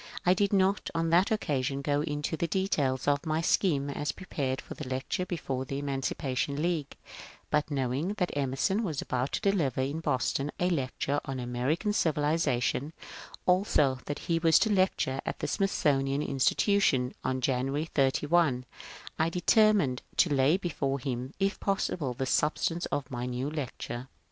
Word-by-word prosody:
I 180 Hz, -, +6 dB
did 200 Hz, +1 st, +1 dB
not 195 Hz, 0 st, +2 dB
on 165 Hz, 0 st, 0 dB
that 175 Hz, +3 st, +4 dB
occasion 140 Hz, -9 st, -1 dB
go 145 Hz, 0 st, +1 dB
into 150 Hz, +1 st, -2 dB
the 170 Hz, -, -1 dB
details 150 Hz, -9 st, 0 dB
of 145 Hz, 0 st, +2 dB
my 155 Hz, -1 st, 0 dB
scheme 165 Hz, -4 st, +2 dB
as 145 Hz, +1 st, -2 dB
prepared 135 Hz, -8 st, -3 dB
for -, -, -8 dB
the 145 Hz, -4 st, -7 dB
lecture 135 Hz, +8 st, -2 dB
before 135 Hz, -7 st, -3 dB
the 135 Hz, +1 st, -4 dB
Eman 140 Hz, -1 st, -2 dB
cipation 135 Hz, +1 st, -2 dB
League; 160 Hz, -3 st, -1 dB, 0.5 s
but 150 Hz, 0 st, +1 dB
knowing 140 Hz, +6 st, -1 dB
that 180 Hz, -7 st, -1 dB
Emerson 140 Hz, -, 0 dB
was 160 Hz, -9 st, -2 dB
about 125 Hz, +2 st, -2 dB
to -, -, -1 dB
deliver 145 Hz, -, 0 dB
in 140 Hz, +4 st, -2 dB
Boston 140 Hz, -1 st, 0 dB
a 180 Hz, +1 st, +2 dB
lecture 140 Hz, -1 st, -1 dB
on 135 Hz, -2 st, -4 dB
^^ 125 Hz, -, -4 dB
American 130 Hz, -, -1 dB
Civilization," 150 Hz, -, +1 dB, 0.5 s
also 180 Hz, -8 st, +3 dB
that 145 Hz, -, -3 dB
he 165 Hz, -1 st, +1 dB
was 165 Hz, -1 st, +5 dB
to 220 Hz, -2 st, +2 dB
lecture 185 Hz, -8 st, +1 dB
at -, -, -4 dB
the -, -, -3 dB
Smithsonian 145 Hz, -8 st, +1 dB
Institution 135 Hz, -, +2 dB
on 130 Hz, 0 st, -1 dB
January 135 Hz, +4 st, 0 dB
31, 140 Hz, -2 st, +2 dB, 0.5 s
1 160 Hz, +1 st, +2 dB
determined 180 Hz, -, +3 dB, 0.2 s
to 165 Hz, -, +4 dB
lay 140 Hz, +5 st, +4 dB
before 140 Hz, -7 st, -2 dB
him, 130 Hz, 0 st, -4 dB
if 195 Hz, +1 st, 0 dB
possible, 170 Hz, -9 st, -1 dB
the 130 Hz, -, -2 dB
substance 165 Hz, +5 st, 0 dB
of 140 Hz, -2 st, -3 dB
my 120 Hz, 0 st, -3 dB
new 125 Hz, +3 st, -3 dB
lecture. 130 Hz, -4 st, -5 dB
145 Hz, 165 wpm, -29 LUFS, 130-170 Hz, 0.5 s, I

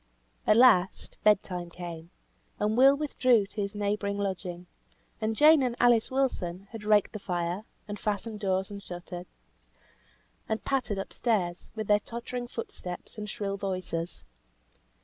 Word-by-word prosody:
At 215 Hz, -, +6 dB
last, 220 Hz, -7 st, +4 dB
bed 210 Hz, -2 st, +5 dB
time 180 Hz, -2 st, -5 dB
came; 170 Hz, -1 st, -8 dB, 0.5 s
and 210 Hz, +1 st, +1 dB
Will 270 Hz, +3 st, +7 dB
withdrew 255 Hz, -7 st, +3 dB
to 205 Hz, +2 st, -5 dB
his 200 Hz, +1 st, -3 dB
neighbouring 205 Hz, 0 st, -1 dB
lodging; 185 Hz, -3 st, -3 dB, 0.6 s
and 220 Hz, 0 st, 0 dB
Jane 305 Hz, +3 st, +7 dB
and 250 Hz, -2 st, 0 dB
Alice 240 Hz, -2 st, +4 dB
Wilson 200 Hz, -9 st, -1 dB
had 225 Hz, -2 st, -8 dB
raked 210 Hz, -1 st, +3 dB
the 215 Hz, -, -5 dB
fire, 175 Hz, +1 st, -2 dB, 0.2 s
and 205 Hz, 0 st, -5 dB
fastened 210 Hz, +1 st, -2 dB
doors 190 Hz, -1 st, 0 dB
and 200 Hz, 0 st, -7 dB
shutters, 175 Hz, -1 st, -8 dB, 1.2 s
and 220 Hz, 0 st, -2 dB
pattered 250 Hz, -7 st, 0 dB
up 195 Hz, -, -5 dB
stairs, 185 Hz, -7 st, -1 dB
with 220 Hz, -1 st, -3 dB
their 205 Hz, 0 st, +4 dB
tottering 240 Hz, +2 st, -5 dB
foot 230 Hz, -1 st, -6 dB
steps, 180 Hz, +4 st, -8 dB
and 210 Hz, 0 st, -5 dB
shrill 200 Hz, -2 st, -3 dB
voices. 185 Hz, -3 st, -3 dB
205 Hz, 150 wpm, -29 LUFS, 185-230 Hz, 1.2 s, Will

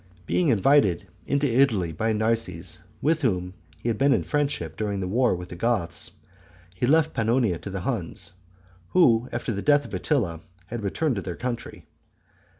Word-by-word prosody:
Being 170 Hz, -, +2 dB
invited 115 Hz, -, +4 dB, 0.2 s
into 140 Hz, +1 st, +1 dB
Italy 115 Hz, -, +2 dB
by 110 Hz, +8 st, 0 dB
Narses, 110 Hz, -6 st, -1 dB, 0.2 s
with 160 Hz, +2 st, +2 dB
whom 90 Hz, -8 st, 0 dB, 0.3 s
he -, -, -2 dB
had 110 Hz, -2 st, 0 dB
been 140 Hz, 0 st, +5 dB
in -, -, +1 dB
friendship 145 Hz, -1 st, -1 dB
during 100 Hz, -2 st, -2 dB
the 95 Hz, -, -2 dB
war 120 Hz, +3 st, +2 dB
with 90 Hz, 0 st, -8 dB
the -, -, -7 dB
Goths, 90 Hz, -4 st, -1 dB, 0.7 s
he 120 Hz, -, 0 dB
left 160 Hz, +2 st, +3 dB
Pannonia 115 Hz, -5 st, +1 dB
to -, -, -7 dB
the 95 Hz, -1 st, -4 dB
Huns, 95 Hz, -7 st, -3 dB, 0.5 s
who 125 Hz, -10 st, +4 dB
after 120 Hz, 0 st, -2 dB
the 100 Hz, -2 st, -3 dB
death 145 Hz, +2 st, +4 dB
of -, -, -11 dB
Attila 100 Hz, -, 0 dB, 0.3 s
had 115 Hz, +5 st, -5 dB
returned 120 Hz, +6 st, 0 dB
to -, -, -1 dB
their 90 Hz, -2 st, -5 dB
country. 120 Hz, +2 st, -5 dB
115 Hz, 170 wpm, -25 LUFS, 95-135 Hz, 0.7 s, been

